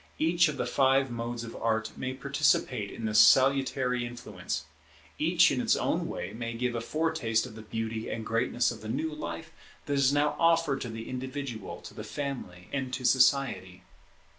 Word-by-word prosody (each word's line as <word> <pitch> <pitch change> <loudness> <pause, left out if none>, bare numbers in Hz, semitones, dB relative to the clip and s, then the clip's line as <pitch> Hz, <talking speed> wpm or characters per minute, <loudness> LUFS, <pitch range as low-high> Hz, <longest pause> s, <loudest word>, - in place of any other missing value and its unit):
Each 170 +2 +3
of 150 -2 -3
the - - -1
five 135 +1 +2
modes 120 0 -4
of 115 0 -8
Art 110 -1 0
may 130 0 -4
participate - - +1
in 115 - -6
this 105 -1 +3
salutary 130 +1 +4
influence; 105 -10 -5 0.5
each - - +4
in - - 0
its - - +3
own - - 0
way - - -5
may 115 0 -4
give 125 +1 -1
a 115 - -2
foretaste 155 -6 0
of 125 - -10
the 110 - -9
beauty 110 0 -4
and 110 -1 -4
greatness 120 +2 +1
of 115 - -9
the 110 - -7
new 160 +7 -2
life 85 - -6 0.3
that 145 - -2
is 140 -1 +3
now 145 +1 +2
offered 165 -4 +3
to 120 - -4
the 115 0 -7
individual, 130 -2 -5
to - - -11
the - - -7
family, 125 -11 -6
and 135 -2 -2
to 130 0 -6
society. 125 -9 +2
125 Hz, 185 wpm, -29 LUFS, 115-135 Hz, 0.5 s, salutary